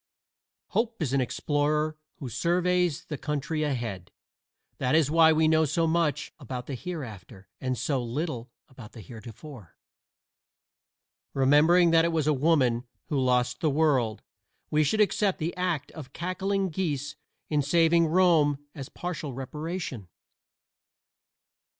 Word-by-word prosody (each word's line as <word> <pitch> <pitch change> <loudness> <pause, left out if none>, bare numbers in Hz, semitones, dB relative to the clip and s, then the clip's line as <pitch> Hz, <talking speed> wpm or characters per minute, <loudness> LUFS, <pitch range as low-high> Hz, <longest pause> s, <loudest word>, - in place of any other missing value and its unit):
Hope 230 0 -1
is 135 -3 -2
an 140 - +3
explorer 150 +4 0 0.2
who 135 - -7
surveys 175 +4 0
the 150 -4 -6
country 150 +1 -2
ahead. 120 - -3 0.7
That 130 +3 +1
is 155 -3 +3
why 160 0 +6
we 160 0 +3
know 160 0 +4
so 165 +3 +1
much 165 -2 0
about 125 -2 -6
the 140 - -6
Hereafter 115 - -8
and 130 -1 -2
so 135 -1 -1
little 125 0 -4 0.2
about 125 -4 -13
the 115 - -10
Heretofore. 115 - -11 1.6
Remembering 155 +6 +5
that 165 0 +5
it 170 - +1
was 160 -3 0
a 155 - +3
woman 130 -5 +2 0.2
who 145 -4 0
lost 125 -1 +1
the 155 - +1
world, 135 -7 +1 0.5
we 155 0 +3
should 215 +9 +1
accept 205 -1 +2
the 165 +2 -3
act 180 -5 -2
of 140 -4 -10
cackling 190 +2 -1
geese 150 -4 -3 0.3
in 150 -1 +1
saving 165 +3 +3
Rome 160 -4 +4 0.2
as 135 -4 -8
partial 165 -6 -5
reparation. 150 - -5
150 Hz, 135 wpm, -27 LUFS, 130-165 Hz, 1.6 s, why